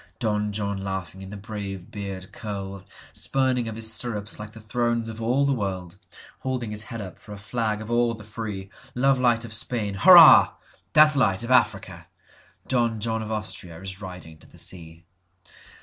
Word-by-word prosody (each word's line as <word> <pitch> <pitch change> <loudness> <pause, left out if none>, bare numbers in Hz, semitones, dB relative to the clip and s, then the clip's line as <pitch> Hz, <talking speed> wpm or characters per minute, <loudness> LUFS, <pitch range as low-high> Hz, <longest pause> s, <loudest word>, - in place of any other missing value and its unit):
Don 105 -2 -1
John 100 -1 -3
laughing 95 -1 -5
in 95 - -9
the 105 - -7
brave 100 -3 -7
beard 95 -2 -6
curled, 100 -2 -6 0.3
Spurning 130 -3 +1
of 110 - -5
his 110 0 -1
stirrups 105 -4 -2
like 105 0 -7
the 110 - -13
thrones 115 +1 -1
of 110 0 -7
all 125 +5 +2
the 140 - +2
world, 95 -5 -4 0.4
Holding 125 -4 -3
his 105 0 -2
head 115 0 -6
up 95 -3 -9
for 105 - -11
a - - -8
flag 110 0 -2
of 110 - -8
all 120 0 +2
the 110 - -12
free. 105 -2 -6 0.2
Love 135 +1 +3
light 120 -2 +2
of 110 - -5
Spain—hurrah! 120 - +7 0.4
Death 150 0 +6
light 110 -6 +2
of 120 - -4
Africa! 120 -4 +1 0.6
Don 120 -3 +1
John 110 +1 -1
of 110 - -6
AustriaIs 95 -3 -5
riding 90 -4 -9
to - - -17
the - - -18
sea. 85 -1 -5
110 Hz, 175 wpm, -25 LUFS, 95-120 Hz, 0.6 s, Spain—hurrah